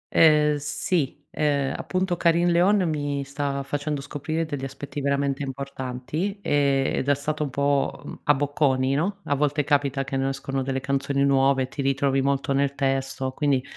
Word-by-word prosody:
Ehm 150 -2 +5
sì, 145 0 -2
ehm, 140 -3 0
appunto 185 -1 -1
Carin 170 +1 +3
Leon, 180 +2 +3
mi 145 -2 -2
sta 140 0 -3
facendo 145 +1 -2
scoprire 155 +3 -3
degli 145 -4 -5
aspetti 145 +2 -6
veramente 140 0 0
importanti, 140 +6 -4
ed 140 -5 +1
è 145 - +5
stato 150 +2 -3
un 145 - -2
po', 140 +1 0
mhmm, - - -8
a 145 - +6
bocconi, 135 -2 +1
no, 195 +7 -1
a 145 - 0
volte 145 +1 +1
capita 140 -1 +1
che 135 0 -5
nascono 135 0 -2
delle 135 0 -2
canzoni 140 +1 0
nuove, 135 -1 +3
ti 140 +2 -5
ritrovi 135 0 +1
molto 140 0 0
nel 140 0 +1
testo. 135 -1 -1
Quindi 140 -2 +1
140 Hz, 160 wpm, -25 LUFS, 135-150 Hz, -, a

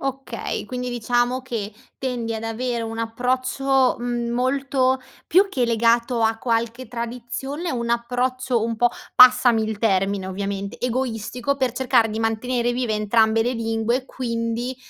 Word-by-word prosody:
Okay, 270 0 -4
quindi 250 -1 -4
diciamo 245 +2 0
che 225 -5 -4 0.3
tendi 245 -3 -2
ad 220 - -5
avere 235 +1 -2
un 225 0 -5
approccio, 255 +3 +1
mhmm, 240 -1 -2
molto 260 +1 +1 0.3
più 385 +4 +4
che 260 -9 0
legato 235 +1 +2
a 225 0 +2
qualche 235 +1 -1
tradizione, 245 +7 -5
un 235 -1 -2
approccio 245 0 0
un 230 0 -2
po', 240 +2 +3 0.3
passami 250 -2 +7
il 215 -1 -4
termine, 195 -2 +1
ovviamente, 200 +1 -4
egoistico 250 +1 -2
per 260 -3 0
cercare 250 -3 +2
di 220 - -3
mantenere 240 +2 0
vive 245 -3 -1
entrambe 220 +1 +3
le 245 - 0
lingue, 230 +2 -1
quindi 235 0 -3
240 Hz, 140 wpm, -22 LUFS, 225-255 Hz, 0.3 s, passami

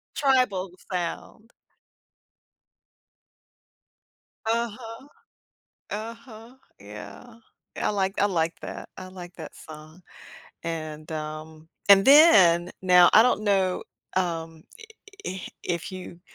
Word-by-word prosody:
Tribal 250 -10 +1 0.2
sound. 185 +5 -5 2.9
Uh-huh. 230 +2 -3 0.8
Uh-huh. 230 +2 -8 0.3
Yeah. 105 - -11 0.4
Yeah, - - -1
I - - +1
like 195 -1 -1
I 205 - +4
like 165 -4 -1
that. - - -8
I 185 - -7
like 180 -1 -10
that 160 -3 -9
song, 155 +3 -13 0.6
and, 155 -2 -6
um 155 +1 -7 0.2
and 195 -1 +8
then 195 - +6
now 180 -1 +6
I 220 - +8
don't 245 -4 +1
know, 190 -3 +1 0.3
um, 165 -3 -3 0.6
i - - -2
i 190 - -7 0.2
if 170 +2 -3
you 180 -2 -9
185 Hz, 105 wpm, -25 LUFS, 165-220 Hz, 2.9 s, and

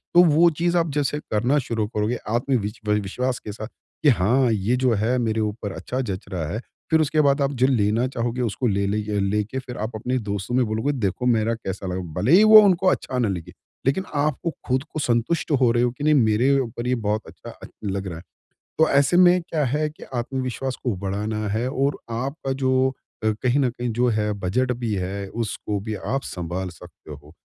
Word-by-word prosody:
तो 175 - +9
वो 165 +1 +5
चीज़ 175 +1 +2
आप 165 -1 +1
जैसे 145 0 -1
करना 120 +7 +2
शुरू 110 -3 -1
करोगे 105 +2 -1
आत्मविश्वा 110 -3 -1
विश्वास 120 +5 -1
के 105 - -7
साथ 110 +1 -7 0.4
कि 150 - +6
हाँ 120 +3 +3
ये 110 +3 +1
जो 125 -2 +4
है 110 +4 +1
मेरे 110 -2 0
ऊपर 105 -1 -3
अच्छा 130 - -4
जच 100 -7 -4
रहा 90 -5 -3
है। 110 - -2 0.3
फ़िर 160 -1 +4
उसके 155 0 +2
बाद 140 0 +3
आप 140 0 +1
जो 130 0 +2
लेना 115 -1 +2
चाहोगे 120 -1 -2
उसको 120 +2 -1
ले 100 -2 +1
ले 100 +2 0 0.2
लेके 105 +5 -1
फ़िर 125 -1 -8
आप 110 +2 -3
अपने 125 +4 -1
दोस्तों 100 +4 -2
में 125 -1 +3
बोलोगे 110 +6 -1
देखो 115 -2 -2
मेरा 115 -2 +2
कैसा 95 -3 -6
लगा। 90 0 -2 0.2
भले 130 - +2
ही 190 +5 +8
वो 215 0 +10
उनको 190 -2 +3
अच्छा 130 -7 0
ना 120 - +2
लगे। 90 -5 -4 0.3
लेकिन 140 +8 +1
आपको 150 +3 0 0.2
ख़ुद 130 +1 +1
को 155 - -5
संतुष्ट 125 +6 0
हो 120 -2 +5
रहे 120 +1 +2
हो 125 - +2
कि 135 +4 -8
नहीं 155 0 +4
मेरे 125 +1 +3
ऊपर 120 -1 -4
ये 125 - +2
बहुत 110 -2 -1
अच्छा - - -11 0.3
लग 100 -1 -2
रहा 85 - -5
है। 85 - -11 0.6
तो 160 0 +5
ऐसे 140 +5 +3
में 180 0 +6
क्या 160 -3 -1
है 150 +4 0
कि 155 - -19
आत्मविश्वास 130 +1 -3
को 120 -4 0
बढ़ाना 105 +3 -3
है 110 +5 -1
और 140 +1 0
आपका 135 +4 -3
जो 130 -1 +2 0.4
अ, - - +1 0.2
कहीं 130 +3 +2
न 130 - +2
कहीं 120 +1 -4
जो 125 0 +3
है 105 -1 0
बजट 125 +8 0
भी 115 -3 -1
है 100 +1 -3
उसको 105 -1 -3
भी 110 +2 -4
आप 135 +6 -2
संभाल 90 -1 -4
सकते 80 -2 -13
हो। 75 +1 -12
120 Hz, 210 wpm, -23 LUFS, 105-135 Hz, 0.6 s, वो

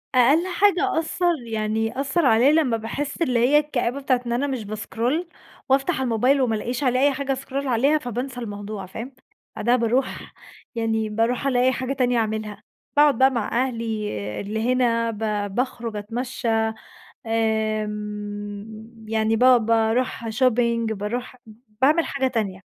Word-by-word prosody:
أقل 280 +8 +4
حاجة 390 -1 +2
أثّر 345 +2 0
يعني 225 +2 -2
أثّر 285 +4 +1
عليّا 245 +3 +5
لمّا 300 -7 +2
باحس 280 +8 -5
اللي 250 -7 +2
هي 260 +5 +5
الكآبة 280 -3 -2
بتاعة 255 -2 +1
إن 235 - -3
أنا 265 +4 0
مش 260 -5 -3
باسكرول 230 - -2 0.4
وأفتح 275 +3 +2
الموبايل 255 +3 +2
وما 235 -4 +1
الاقيش 245 +5 -3
عليه 255 -1 +2
أي 285 +1 +4
حاجة 275 0 -1
اسكرول 275 +1 -4
عليها 265 +5 +3
فبانسى 245 -1 -5
الموضوع 205 -3 -6
فاهم؟ 230 +8 -7 0.4
بعدها 240 +3 +2
باروح 250 +2 -1 0.4
يعني 220 -1 0
باروح 230 +5 0
ألاقي 255 -1 +3
حاجة 260 +1 -2
تانية 250 -3 +1
أعملها، 215 -1 -2 0.3
باقعد 290 -4 +5
بقى 265 0 +6
مع 240 +2 0
أهلي 225 -3 -3 0.4
اللي 220 +4 -1
هنا 230 -2 +1
ب 210 -2 -3
باخرج 240 -3 -2
أتمشى 240 +4 -4 0.8
آمم، 215 0 -3
يعني 220 0 +1
ب - - -3
باروح 230 -1 +3
shopping 235 -1 +1
باروح 235 +5 -4 0.4
باعمل 305 +5 +4
حاجة 270 -1 -1
تانية. 210 -7 -2
240 Hz, 140 wpm, -23 LUFS, 220-265 Hz, 0.8 s, بقى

